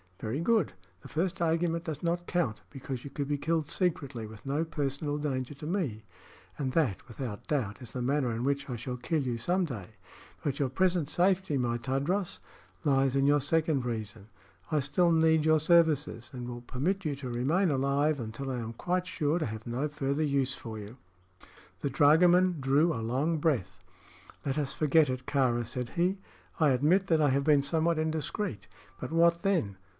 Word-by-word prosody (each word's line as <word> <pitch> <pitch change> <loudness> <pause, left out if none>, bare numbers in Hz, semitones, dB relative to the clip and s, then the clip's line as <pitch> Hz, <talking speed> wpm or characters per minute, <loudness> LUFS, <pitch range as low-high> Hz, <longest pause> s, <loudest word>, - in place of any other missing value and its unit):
"Very 115 +6 -3
good. 210 - +2 0.3
The - - -11
first 170 +2 -2
argument 165 0 +1
does 155 -4 -5
not 175 +1 0
count, 125 -14 -1
because 130 -2 -6
you 140 - -7
could 140 0 -4
be 145 0 0
killed 160 0 0
secretly, 140 - -2
with 110 +2 -13
no 140 +4 0
personal 145 -2 -2
danger 140 -2 -3
to 145 - -9
me; 150 - -2 0.6
and 130 -3 -1
that, 105 - 0
without 115 -3 -6
doubt, 115 -9 -1
is 120 - -9
the 125 - -3
manner 135 -1 +1
in 115 +1 -3
which 140 +1 -1
I 125 - -2
shall 125 +2 -5
kill 155 +5 -1
you 125 -3 -2
some 180 +9 +1
day. 110 - -6 0.5
But 140 -2 -2
your 140 -2 +1
present 175 +1 +1
safety, 185 -3 +2
my 120 -2 0
Tadros, 140 +10 -1 0.4
lies 135 -3 +2
in 135 0 +3
your 145 0 +4
second 155 -1 +1
reason. 110 -3 -5 0.4
I 155 - +3
still 150 +6 +2
need 160 -1 +4
your 155 0 +5
services, 150 -7 +3
and 125 -1 -6
will 120 -1 -6
permit 155 +11 -2
you 145 -2 0
to 135 -2 -6
remain 145 +11 +1
alive 140 +2 +1
until 120 +4 -5
I 125 - -2
am 115 0 -5
quite 180 +8 -1
sure 160 -2 0
to 155 - -1
have 110 0 -7
no 125 +5 -1
further 145 0 -1
use 140 -3 +1
for 110 -2 -7
you." 105 +4 -10 0.8
The 140 - -1
dragoman 175 +5 +5
drew 140 +5 +3
a 115 - -3
long 135 +9 0
breath. 115 - -1 0.6
"Let 135 0 -1
us 145 -2 -1
forget 155 -1 +3
it, 130 0 -3
Kāra," 125 -4 +1
said 125 +1 -4
he. 180 - 0 0.4
"I 155 -2 +5
admit 160 +10 +3
that 160 -3 +3
I 145 - +4
have 140 +1 +2
been 145 -1 +4
somewhat 160 +3 +1
indiscreet; 160 - -2 0.3
but - - -5
what 170 +1 +4
then? 165 - +1
145 Hz, 190 wpm, -30 LUFS, 125-165 Hz, 0.8 s, your